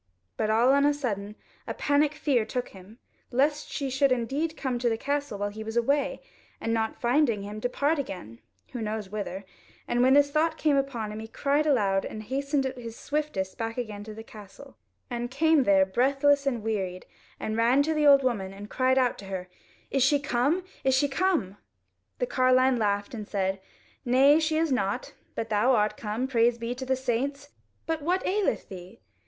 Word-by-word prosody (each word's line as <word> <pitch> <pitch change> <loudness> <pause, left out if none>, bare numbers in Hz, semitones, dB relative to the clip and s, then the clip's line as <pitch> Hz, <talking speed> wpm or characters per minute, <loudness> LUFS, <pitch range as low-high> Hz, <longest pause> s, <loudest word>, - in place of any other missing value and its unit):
But 215 - -1
all 230 +4 +4
on 280 0 +4
a 290 0 +3
sudden 210 -7 -4 0.3
a - - -4
panic 290 +1 +2
fear 275 -6 +1
took 245 +3 -4
him, 195 +4 -14 0.3
lest 295 +4 +1
she 275 -2 -3
should 270 +1 +2
indeed 275 +7 -1
come 255 -3 -2
to 240 0 +1
the 225 - -1
castle 285 -3 -2
while 205 0 -2
he 220 +1 -7
was 220 +2 -4
away, 280 +5 +1 0.4
and 225 - -1
not 220 -1 -1
finding 240 -4 +2
him, 205 +1 -6
depart 285 +6 0
again, 180 - -6 0.3
who 245 - -4
knows 215 -2 -4
whither; 200 -2 -5 0.4
and 240 - +1
when 260 +2 +5
this 285 0 +4
thought 315 +2 +1
came 300 -2 +2
upon 260 -6 -1
him, 215 - -6
he 220 - -7
cried 285 +6 0
aloud, 200 -9 +2
and 215 - -6
hastened 275 +4 -1
at 260 -1 -4
his 230 -2 -7
swiftest 285 -11 -3
back 225 +1 -3
again 215 -4 -5
to 215 0 -9
the 220 - -8
castle, 205 - -13 0.4
and 240 0 -3
came 305 +1 +3
there 195 -1 +5
breathless 275 +7 +2
and 240 -5 -1
wearied, 190 -5 -3 0.3
and 215 - -3
ran 240 +5 +4
to 320 +2 0
the 305 -1 +2
old 280 -1 +7
woman, 205 -7 -1
and 200 +1 -10
cried 260 0 +2
out 250 -2 +2
to 200 - -9
her; 190 -1 -5 0.4
"Is 270 - +1
she 285 +3 +4
come? 280 +6 0 0.2
is 265 -1 +3
she 285 +2 +3
come?" 275 - 0 0.6
The 250 - 0
carline 255 0 +3
laughed 205 0 0
and 215 -3 -6
said, 190 -1 -1 0.4
"Nay, 270 +5 +5
she 315 0 0
is 320 -2 +1
not, 200 -6 -1 0.2
but 225 0 -3
thou 220 +5 +3
art 210 -1 +1
come: 220 +3 -3
praise 235 -2 +2
be 235 +1 -3
to 260 +1 -7
the 260 - +2
saints! 265 +3 -2 0.4
But 325 -1 -2
what 360 +5 0
aileth 405 +1 0
thee? 185 +4 -11
245 Hz, 195 wpm, -27 LUFS, 215-280 Hz, 0.6 s, old